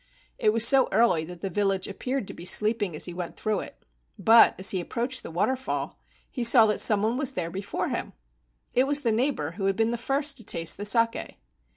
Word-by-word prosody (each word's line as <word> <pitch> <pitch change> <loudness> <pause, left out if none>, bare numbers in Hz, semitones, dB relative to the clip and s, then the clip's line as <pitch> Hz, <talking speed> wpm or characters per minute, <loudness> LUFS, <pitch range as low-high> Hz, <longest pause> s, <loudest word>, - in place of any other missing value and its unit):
It 215 - +3
was 230 +1 +4
so 270 +1 +4
early 205 -7 +2
that 175 0 -11
the 195 - -3
village 195 0 -1
appeared 250 +3 -4
to - - -8
be - - -11
sleeping 210 -1 +1
as - - -4
he 175 - -6
went 175 -1 -7
through 215 -3 -2
it, - - -11 0.3
but 225 +1 +5
as 190 - +1
he 185 -2 -2
ap¬ - - -15
proached 250 +1 -3
the - - -9
waterfall 255 +11 -3 0.3
he 250 - -5
saw 235 -1 +7
that 210 -1 0
some 210 -2 +4
one 225 +3 0
was 270 -1 -2
there 170 -7 -4
before 195 +2 -4
him. - - -5 0.6
It 255 +2 +2
was 290 0 +2
the 235 - 0
neighbor 225 - -1
who 195 +3 -5
had 195 0 +1
been 225 +2 0
the 235 - -4
first 275 +3 -2
to 230 - -11
taste 165 -5 -1
the 205 - -6
saki. 230 +2 0
220 Hz, 230 wpm, -26 LUFS, 190-245 Hz, 0.6 s, saw